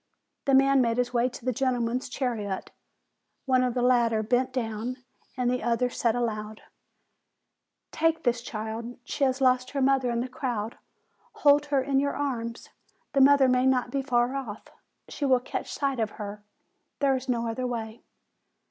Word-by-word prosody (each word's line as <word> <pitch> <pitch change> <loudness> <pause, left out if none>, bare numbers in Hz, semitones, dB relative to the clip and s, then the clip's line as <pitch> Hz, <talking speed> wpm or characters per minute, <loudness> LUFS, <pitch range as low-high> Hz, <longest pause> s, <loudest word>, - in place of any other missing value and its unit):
The 275 - +4
man 275 0 +5
made 230 -1 +1
his 245 0 0
way 240 +1 +2
to 245 - -11
the 255 - +2
gentlemen's 250 0 -1
chariot; 225 -7 -3 0.7
one 255 -2 +3
of 250 -1 -1
the 245 - +1
latter 235 -3 +3
bent 250 +4 +1
down, 235 0 -3 0.4
and 250 -1 0
the 250 0 0
other 240 +2 +1
said 230 -1 0
aloud: 220 -3 -3 1.3
"Take 325 0 +1
this 240 -2 +1
child; 225 +1 -5
she 280 +3 0
has 260 0 0
lost 255 -1 +3
her 280 - -3
mother 265 -1 +3
in 235 0 0
the 250 - -3
crowd; 245 -5 -4 0.5
hold 290 0 +4
her 280 -2 +1
in 270 0 +1
your 280 +1 0
arms; 235 -5 -3 0.4
the 275 - +4
mother 275 0 +6
may 255 0 +3
not 250 -2 +1
be 275 - 0
far 250 -1 +1
off, 230 -6 -6 0.4
and - - -12
she - - -5
will 260 -2 +4
catch 245 - -5
sight 275 -3 -1
of 220 -1 0
her: 205 0 -7 0.5
there 275 -2 +2
is 260 0 -5
no 235 -1 0
other 250 +3 -2
way." 225 -2 -5
250 Hz, 175 wpm, -27 LUFS, 230-265 Hz, 1.3 s, mother